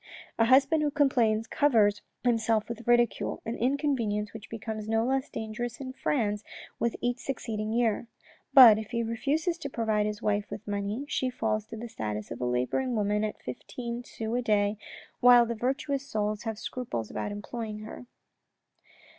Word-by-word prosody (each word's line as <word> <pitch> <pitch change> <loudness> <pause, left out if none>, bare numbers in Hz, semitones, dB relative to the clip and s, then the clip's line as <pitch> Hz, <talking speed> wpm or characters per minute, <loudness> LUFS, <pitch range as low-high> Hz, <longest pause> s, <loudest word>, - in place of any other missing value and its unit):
A 225 - +5
husband 270 +5 +5
who 300 - +2
complains 245 -7 +2
covers 220 -7 +3 0.2
himself 225 -3 +2
with 235 0 -7
ridicule, 240 0 +2
an 230 - -3
inconvenience 240 -5 0
which 220 -1 -10
becomes 220 -1 -5
no 225 +1 +2
less 265 +2 0
dangerous 225 +1 -5
in 260 -1 -6
France 215 -7 -1 0.4
with 235 +1 0
each 245 0 -1
succeeding 220 -5 -3
year; 230 -1 +1 0.4
but 235 -6 +10
if 220 - -7
he 235 -1 -1
refuses 295 +9 -1
to 280 - -5
provide 220 -4 0
his 210 0 -4
wife 205 0 0
with 215 - -8
money, 205 +6 -2
she 260 -3 0
falls 215 -3 -1
to 225 - -8
the 235 +2 -6
status 105 - -5
of 120 - -6
a - - 0
labouring 125 - 0
woman 210 0 +1
at 215 - -4
fifteen 235 - -6
sous 225 -1 -4
a 250 - +1
day, 210 -2 +1 0.4
while 245 -1 +7
the 235 - -2
virtuous 270 +4 -2
souls 210 -1 -2
have 225 -1 -3
scruples 120 - -4
about 205 - -3
employing 215 +1 -5
her. 220 +3 -9
225 Hz, 170 wpm, -28 LUFS, 210-250 Hz, 0.4 s, but